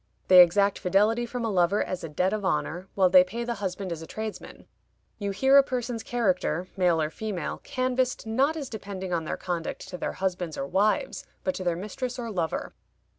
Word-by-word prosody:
They 185 -1 +10
exact 200 +3 +4
fidelity 210 +6 +2
from 240 0 -3
a 225 - -1
lover 185 +2 +2
as 185 - -5
a 165 - -5
debt 180 +6 0
of 215 -1 -2
honor, 180 -1 -1
while 190 -2 +5
they 185 -1 +8
pay 225 +6 -5
the 235 0 -2
husband 190 -1 -3
as 165 -1 -4
a 160 - -9
tradesman. 220 -1 -7 0.5
You 200 -1 -2
hear 265 +8 +5
a - - +6
person's 245 -3 -3
character, 185 - 0
male 180 -4 +2
or 155 0 -1
female, 200 -6 -4
canvassed, 255 -1 -1
not 270 +8 +1
as 285 -3 -4
depending 195 -5 -6
on 165 -2 -1
their - - -3
conduct 175 -3 -4
to 180 - -7
their - - -2
husbands 180 -4 -3
or 135 - -2
wives, 210 - 0 0.2
but 280 - 0
to 190 - -5
their 175 -2 +1
mistress 240 +7 -5
or 235 -2 -4
lover. 170 -5 -2
195 Hz, 205 wpm, -27 LUFS, 180-235 Hz, 0.5 s, They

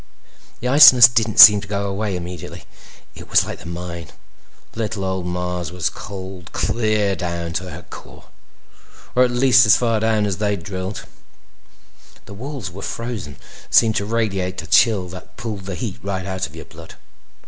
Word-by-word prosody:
The 125 - -3
iciness 130 -3 +9
didn't 115 -3 -1
seem 105 -2 +10
to 100 - -10
go 100 0 -3
away 100 0 -3
immediately. 90 0 -8 0.5
It - - -13
was - - +3
like - - -7
the - - -11
mine. 85 -1 -7 0.6
Little 110 -3 -4
old 95 -1 -3
Mars 90 0 -4
was 90 -2 -2
cold 95 -2 -9
clear 110 -3 0
down 85 -2 -5
to 90 +2 -4
her - - -10
core—or 125 - -7
at 125 - +2
least 125 0 +4
down - - +2
as 105 - +6
far 115 -3 -1 0.2
as 100 -3 -2
they'd 105 -3 -2
drilled. 95 +2 -6 1.2
The 100 - -11
walls 125 - -7
were 100 +3 -10
frozen 115 -9 -6
and - - -22 0.3
seemed 110 -2 +4
to 100 - -2
radiate 100 -5 -2
a - - -10
chill 95 +3 +3
that 90 +1 -12
pulled 105 -5 -6
the 95 -1 -5
heat 105 -1 -6
right 95 -2 -4
out 95 -1 -3
of 75 - -17
your 80 -2 -10
blood. 80 0 -14
100 Hz, 170 wpm, -20 LUFS, 90-110 Hz, 1.2 s, seem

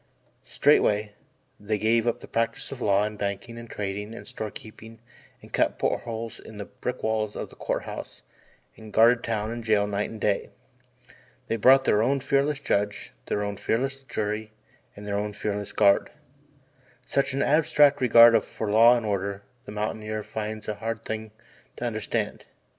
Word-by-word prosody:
Straightway, 105 0 +3 0.5
they 105 +1 -1
gave 115 +2 +2
up 120 +1 0
the - - -10
practice 115 0 -2
of 135 -2 -7
law 100 -1 +3
and 105 -1 -4
banking 100 +4 -4
and 115 -1 -10
trading 105 +2 -4
and - - -10
store 110 - -5
keeping 110 +2 -12 0.4
and - - -15
cut - - +1
port - - 0
holes 115 -1 -5
in 110 - -12
the 100 - -5
brick 125 +7 -6
walls 110 -1 -1
of - - -6
the - - -14
Court - - -2
House - - -8 0.5
and 110 -1 -12
guarded 115 +2 +5
town 110 -1 -2
and 120 0 -5
jail 105 -2 +3
night 105 0 -2
and 110 - -9
day. 100 -1 0 1.0
They - - +1
brought 130 +4 +6
their 105 - +3
own 135 +4 +2
fearless 140 +2 +1
judge, 105 -6 -1
their 105 - -1
own 100 -1 -3
fearless 135 +4 -1
jury 110 -4 -3 0.4
and 105 - -10
their 100 0 -1
own 105 0 -3
fearless 105 0 -3
guard. 100 -2 +4 1.0
Such 140 -1 0
an 140 - +1
abstract 145 -2 +4
regard 115 -1 +7
for 105 -2 -4
law 115 +3 +7
and 115 - -4
order 100 -1 -2 0.2
the - - -8
mountaineer 110 0 -3
finds 110 0 -5
a 105 - -1
hard 115 +1 -5
thing 110 0 -4 0.5
to 125 - -4
understand. 110 -3 -3
110 Hz, 175 wpm, -26 LUFS, 105-115 Hz, 1.0 s, regard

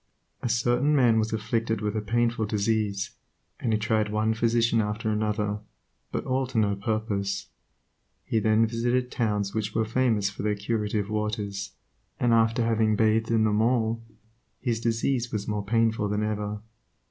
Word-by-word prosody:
A 120 - -2
certain 120 +6 +2
man 120 -5 +4
was 110 0 0
afflicted 110 0 -1
with 105 0 -2
a 110 - 0
painful 115 0 0
disease, 105 -1 0 0.5
and 115 - -1
he 110 - +3
tried 110 -1 +1
one 110 +1 +1
physician 115 0 +2
after 105 +1 -2
another, 105 -1 -1 0.5
but - - -3
all 130 0 0
to 130 -1 -5
no 105 -2 +3
purpose. 100 -1 -2 0.8
He 115 - +1
then 110 +1 +3
visited 120 +2 0
towns 105 -4 -1
which 105 -1 -2
were 110 0 +2
famous 115 -3 +1
for 105 - -7
their 105 0 0
curative 105 0 -2
waters, 105 -2 -3 0.5
and 120 -1 +3
after 115 +1 +3
having 110 -1 +2
bathed 110 +1 +2
in 115 -1 +3
them 105 0 +2
all, 115 -1 +1 0.6
his 115 -3 -1
disease 120 +1 0
was 105 -1 -3
more 105 -1 -1
painful 110 0 +1
than 105 +1 0
ever. 105 -1 -2
110 Hz, 160 wpm, -27 LUFS, 105-115 Hz, 0.8 s, man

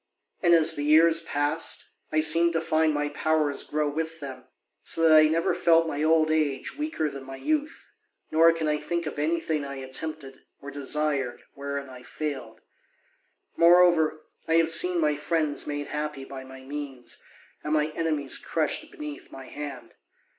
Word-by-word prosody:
And 170 -1 +5
as 165 0 +5
the 145 - -3
years 160 +2 +5
passed, 145 0 -2 0.2
I 155 - +2
seemed 165 +2 +5
to 165 - 0
find 160 -1 +2
my 145 0 -1
powers 150 -1 0
grow 150 0 -2
with 160 +2 -4
them, 130 -3 -9 0.4
so 165 0 +4
that 155 - +6
I 155 0 +7
never 165 +2 +1
felt 165 -1 +3
my 150 -2 -3
old 155 0 +3
age 150 -4 -1
weaker 300 - -2
than 140 -2 -7
my 135 0 -9
youth, 305 - -2 0.4
nor 165 +1 +6
can 165 -1 -2
I 150 0 +1
think 170 +1 -3
of 155 - -5
anything 160 -1 -1
I 140 0 -6
attempted 135 +1 -6 0.2
or 145 - -9
desired 140 -3 -2
wherein 140 0 -5
I 130 -1 -12
failed. 130 -5 -6 0.9
Moreover, 170 -3 +4 0.2
I 160 - +2
have 165 -1 +4
seen 175 +2 +4
my 150 -2 +2
friends 155 0 -1
made 145 0 -3
happy 150 -2 -4
by 135 -1 -9
my 130 0 -12
means, 135 -2 -7 0.4
and 150 - -4
my 150 0 +1
enemies 155 -4 -1
crushed 160 -2 -2
beneath 150 -1 -9
my 135 - -10
hand. 145 -4 -8
155 Hz, 170 wpm, -26 LUFS, 140-165 Hz, 0.9 s, I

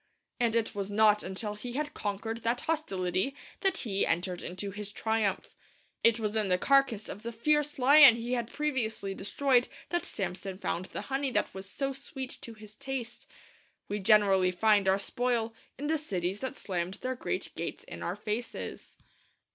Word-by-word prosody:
And 235 -2 +2
it 230 -1 +1
was 200 -1 -3
not 210 0 +4
until 200 +3 -4
he 240 +4 -7
had 295 +2 -2
conquered 220 +3 -3
that 235 +2 0
hostility 195 - -1 0.2
that 385 -2 +1
he 200 -5 0
entered 175 +1 0
into 185 +3 -4
his 205 +1 -5
triumph. 220 -3 -1 0.5
It 230 -1 +5
was 215 -1 -2
in 215 -2 +1
the 180 -1 +3
carcase 275 -2 +3
of 205 - -7
the 235 +1 -4
fierce 295 +5 +1
lion 275 -1 +9
he 235 +2 -3
had 240 -2 -1
previously 235 -9 -1
destroyed 245 +6 +2 0.2
that 345 0 -1
Samson 190 0 -4
found 185 -2 -2
the - - -6
honey 275 0 +1
that - - +1
was 190 0 -7
so 275 +5 -1
sweet 265 -1 -5
to 230 - -8
his 215 -1 -12
taste. 260 -2 -6 0.6
We 205 - -1
generally 195 -2 +5
find 205 +2 +3
our 190 +1 +5
spoil 230 +2 -1 0.2
in 285 - -5
the 315 +1 +1
cities 190 - -2
that 260 - -4
slammed 180 -1 -3
their 255 +4 -3
great - - -3
gates - - -5
in - - -9
our - - -2
faces. 220 +3 -5
220 Hz, 175 wpm, -30 LUFS, 195-260 Hz, 0.6 s, lion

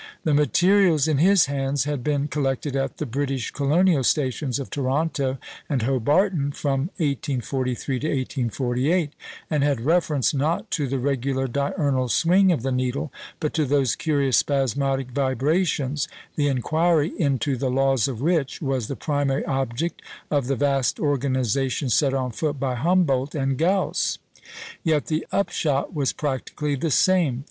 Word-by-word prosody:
The 155 - +1
materials 160 - +3
in 150 -3 +1
his 190 +1 +5
hands 140 0 -1
had 145 -3 -3
been 145 0 0
collected 140 -1 -2
at 135 -1 -2
the 150 - -3
British 135 -1 -2
colonial 150 +1 +2
stations 130 -1 0
of 140 - -6
Toronto 140 0 -1 0.3
and 135 -4 0
Hobarton 145 - +1
from 140 +2 -1
1843 135 - -2
to 155 - -2
1848, 135 - -1 0.4
and 150 -2 +2
had 140 -5 +1
reference, 155 -1 +1
not 150 +4 -1
to 145 -3 0
the 135 +2 -1
regular 135 0 -1
diurnal 140 -1 0
swing 185 +7 +4
of 150 -9 -1
the 135 - -1
needle, 130 +3 -2 0.3
but 155 -3 -2
to 160 - +1
those 135 -3 +1
curious 140 -5 +1
spasmodic 135 -1 0
vibrations, 140 +2 0 0.3
the 145 -1 +1
inquiry 155 +4 +1
into 140 -1 +1
the 130 +1 -1
laws 135 -2 +2
of 125 -4 -5
which 160 -3 0
was 135 -6 -2
the 140 - -4
primary 145 -2 -1
object 135 +4 -2 0.3
of 140 -4 +1
the 135 - +1
vast 135 -1 +1
organisation 135 -2 0
set 135 +4 +2
on 130 -2 -1
foot 145 +5 -2
by 130 -1 -1
Humboldt 145 -1 +1
and 135 -2 0
Gauss. 185 +7 +1 0.7
Yet 155 -3 +1
the 155 0 -2
upshot 155 -6 0
was 140 -4 0
practically 145 +1 -3
the 150 +4 -1
same. 160 -4 +3
140 Hz, 150 wpm, -23 LUFS, 130-150 Hz, 0.7 s, his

